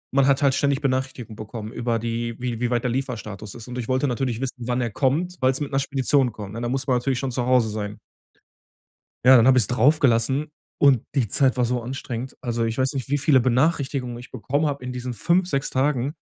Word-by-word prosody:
man 140 Hz, -1 st, +4 dB
hat 140 Hz, +1 st, +3 dB
halt 135 Hz, -2 st, +4 dB
ständig 140 Hz, 0 st, +1 dB
Benachrichtigungen 130 Hz, -4 st, -2 dB
bekommen 110 Hz, 0 st, -7 dB
über 120 Hz, -1 st, -1 dB
die 115 Hz, +1 st, -3 dB
wie 120 Hz, -2 st, -3 dB
wie 125 Hz, -, 0 dB
weit 120 Hz, -1 st, 0 dB
der 125 Hz, -, 0 dB
der 125 Hz, -, 0 dB
Lieferstatus 110 Hz, -6 st, -6 dB
ist. 115 Hz, 0 st, -10 dB
Und 125 Hz, 0 st, -5 dB
ich 115 Hz, -, -4 dB
wollte 130 Hz, +2 st, +1 dB
natürlich 125 Hz, -2 st, -2 dB
wissen, 125 Hz, -2 st, -5 dB
wann 125 Hz, 0 st, 0 dB
er 120 Hz, -, -2 dB
kommt, 160 Hz, +10 st, 0 dB
weil's 130 Hz, +1 st, +2 dB
mit 145 Hz, -, -4 dB
'ner 135 Hz, -, +1 dB
Spedition 135 Hz, -2 st, +1 dB
kommt, 105 Hz, -1 st, -8 dB
ne? 115 Hz, -, -5 dB
Da 120 Hz, -, -2 dB
muss 135 Hz, +1 st, -1 dB
man 125 Hz, -, +3 dB
natürlich 125 Hz, +1 st, -1 dB
schon 135 Hz, -2 st, -2 dB
zu 120 Hz, 0 st, -2 dB
Hause 125 Hz, -3 st, +3 dB
sein. 105 Hz, -1 st, -5 dB, 1.3 s
Ja, 130 Hz, 0 st, +9 dB
dann 115 Hz, -, +5 dB
habe 130 Hz, -1 st, +6 dB
ich 125 Hz, -, +5 dB
es -, -, -3 dB
drauf 130 Hz, +6 st, +3 dB
gelassen, 135 Hz, +4 st, +2 dB, 0.3 s
und 135 Hz, -5 st, +5 dB
die 120 Hz, -6 st, +1 dB
Zeit 135 Hz, +2 st, +2 dB
war 125 Hz, -, +1 dB
so 120 Hz, 0 st, 0 dB
anstrengend. 125 Hz, 0 st, -5 dB
Also, 120 Hz, -1 st, -1 dB
ich 115 Hz, 0 st, -3 dB
weiß 130 Hz, 0 st, +1 dB
nicht, 135 Hz, -3 st, -4 dB
wie 145 Hz, +1 st, +1 dB
viele 140 Hz, -1 st, +4 dB
Benachrichtigungen 130 Hz, -1 st, 0 dB
ich 120 Hz, -, -12 dB
bekommen 145 Hz, +4 st, -1 dB
habe 140 Hz, -2 st, -3 dB
in 125 Hz, -, -4 dB
diesen 125 Hz, 0 st, -5 dB
5, 170 Hz, -, +1 dB
6 140 Hz, -4 st, -1 dB
Tagen, 135 Hz, 0 st, 0 dB
125 Hz, 240 wpm, -23 LUFS, 120-135 Hz, 1.3 s, Ja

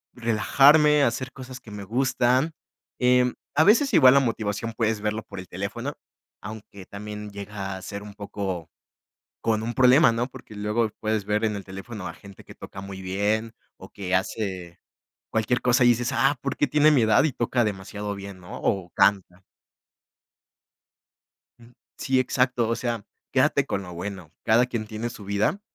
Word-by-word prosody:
Relajarme, 140 Hz, +6 st, +5 dB
hacer 130 Hz, +2 st, -1 dB
cosas 130 Hz, -1 st, -10 dB
que 115 Hz, -, -13 dB
me 100 Hz, -1 st, -7 dB
gustan, 130 Hz, +5 st, +1 dB, 0.5 s
em, 125 Hz, 0 st, +3 dB, 0.2 s
a 155 Hz, -, +5 dB
veces 240 Hz, -, +4 dB
igual 130 Hz, -8 st, +8 dB
la 140 Hz, -, +6 dB
motivación 115 Hz, -3 st, -2 dB
puedes 110 Hz, -2 st, 0 dB
verlo 105 Hz, +1 st, -2 dB
por 100 Hz, -, -9 dB
el 90 Hz, -, -9 dB
teléfono, 105 Hz, +10 st, -4 dB, 0.5 s
aunque 100 Hz, -2 st, -9 dB
también 105 Hz, +1 st, -8 dB
llega 100 Hz, -1 st, -6 dB
a -, -, -10 dB
ser 100 Hz, +1 st, -7 dB
un 105 Hz, -1 st, -10 dB
poco 95 Hz, -5 st, -5 dB, 0.7 s
con 110 Hz, -1 st, 0 dB
un 115 Hz, +1 st, -3 dB
problema, 130 Hz, +2 st, +6 dB
¿no?, 115 Hz, +1 st, -1 dB
porque 125 Hz, -4 st, -13 dB
luego 105 Hz, +2 st, 0 dB
puedes 110 Hz, -2 st, -1 dB
ver 105 Hz, +2 st, 0 dB
en 105 Hz, -1 st, -2 dB
el 100 Hz, -, -7 dB
teléfono 95 Hz, +1 st, -8 dB
a -, -, -8 dB
gente 100 Hz, -1 st, -14 dB
que -, -, -13 dB
toca 95 Hz, -, -10 dB
muy 95 Hz, -1 st, -8 dB
bien 105 Hz, +4 st, -1 dB, 0.3 s
o -, -, -11 dB
que 95 Hz, -2 st, -4 dB
hace 95 Hz, -2 st, -2 dB, 0.5 s
cualquier 110 Hz, +3 st, +1 dB
cosa 125 Hz, +1 st, +3 dB
y -, -, +6 dB
dices: 120 Hz, +1 st, +2 dB
"Ah, 135 Hz, +3 st, +2 dB
¿por 140 Hz, -, -2 dB
qué -, -, +2 dB
tiene 150 Hz, +3 st, +4 dB
mi 140 Hz, -5 st, +4 dB
edad 110 Hz, -1 st, +4 dB
y 155 Hz, -, +1 dB
toca 120 Hz, +1 st, 0 dB
demasiado 105 Hz, 0 st, -4 dB
bien, 100 Hz, -1 st, -9 dB
no?, 90 Hz, -, -9 dB
o 95 Hz, -3 st, -1 dB
canta". 95 Hz, -2 st, +1 dB, 2.2 s
Ujú, 120 Hz, +1 st, -18 dB, 0.2 s
sí, 130 Hz, -1 st, +1 dB
exacto. 125 Hz, -2 st, +1 dB
O 115 Hz, -, +1 dB
sea, 120 Hz, -3 st, -3 dB, 0.3 s
quédate -, -, +3 dB
con 100 Hz, -, -2 dB
lo 90 Hz, -1 st, -9 dB
bueno, 90 Hz, -2 st, -7 dB
cada 115 Hz, +3 st, +4 dB
quien 115 Hz, -4 st, -4 dB
tiene 110 Hz, +2 st, -4 dB
su 115 Hz, -4 st, -10 dB
vida 100 Hz, -, 0 dB
110 Hz, 175 wpm, -25 LUFS, 100-125 Hz, 2.2 s, igual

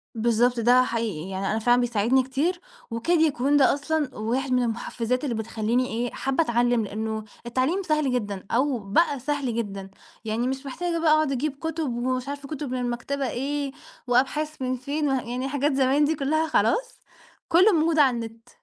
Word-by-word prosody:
بالضبط، 235 Hz, +2 st, +2 dB
ده 245 Hz, +2 st, +5 dB
حقيقي، 215 Hz, -9 st, -3 dB
يعني 195 Hz, +1 st, -2 dB
أنا 220 Hz, -, 0 dB
فعلًا 245 Hz, +2 st, +3 dB
بيساعدني 240 Hz, +2 st, +2 dB
كتير 305 Hz, +8 st, -1 dB, 0.3 s
وكاد 320 Hz, +10 st, +1 dB
يكون 290 Hz, -2 st, +2 dB
ده 270 Hz, -, +5 dB
أصلًا 295 Hz, -2 st, -2 dB
واحد 255 Hz, +5 st, -1 dB
من 250 Hz, -1 st, +3 dB
المحفّزات 235 Hz, +2 st, -2 dB
اللي 245 Hz, -5 st, -1 dB
بتخلّيني 225 Hz, +3 st, -1 dB
إيه، 235 Hz, +2 st, -2 dB
حابّة 270 Hz, +5 st, 0 dB
أتعلّم 240 Hz, -2 st, +2 dB
لإنه 220 Hz, +1 st, -4 dB, 0.2 s
التعليم 260 Hz, +11 st, 0 dB
سهل 305 Hz, -5 st, +1 dB
جدًا 205 Hz, -6 st, -3 dB
أو 260 Hz, +1 st, +1 dB
بقى 265 Hz, +9 st, +1 dB
سهل 270 Hz, -3 st, -2 dB
جدًا 195 Hz, -4 st, -4 dB, 0.4 s
يعني 225 Hz, +3 st, -1 dB
مش 265 Hz, +1 st, -3 dB
محتاجة 335 Hz, +5 st, -2 dB
بقى 320 Hz, -2 st, +3 dB
أقعُد 310 Hz, -2 st, +3 dB
أجيب 275 Hz, +2 st, -1 dB
كُتب 320 Hz, -5 st, -2 dB
ومش 255 Hz, +2 st, -2 dB
عارفة 285 Hz, 0 st, -6 dB
كُتب 285 Hz, -3 st, -5 dB
من 255 Hz, -, -1 dB
المكتبة 250 Hz, +2 st, -2 dB
إيه، 280 Hz, +2 st, -2 dB, 0.4 s
وأبحاث 270 Hz, +4 st, 0 dB
من 255 Hz, 0 st, 0 dB
فين، 285 Hz, +3 st, -2 dB
وه 265 Hz, -2 st, +1 dB
يعني 250 Hz, +3 st, -4 dB
حاجات 285 Hz, +1 st, 0 dB
زمان 270 Hz, +2 st, +3 dB
دي 315 Hz, +2 st, +1 dB
كلّها 310 Hz, +3 st, 0 dB
خلاص، 485 Hz, +9 st, +1 dB, 0.5 s
كلّه 370 Hz, +6 st, +5 dB
موجود 320 Hz, -2 st, +2 dB
على 265 Hz, -4 st, +5 dB
النت. 230 Hz, +1 st, -7 dB
255 Hz, 175 wpm, -25 LUFS, 235-290 Hz, 0.5 s, ده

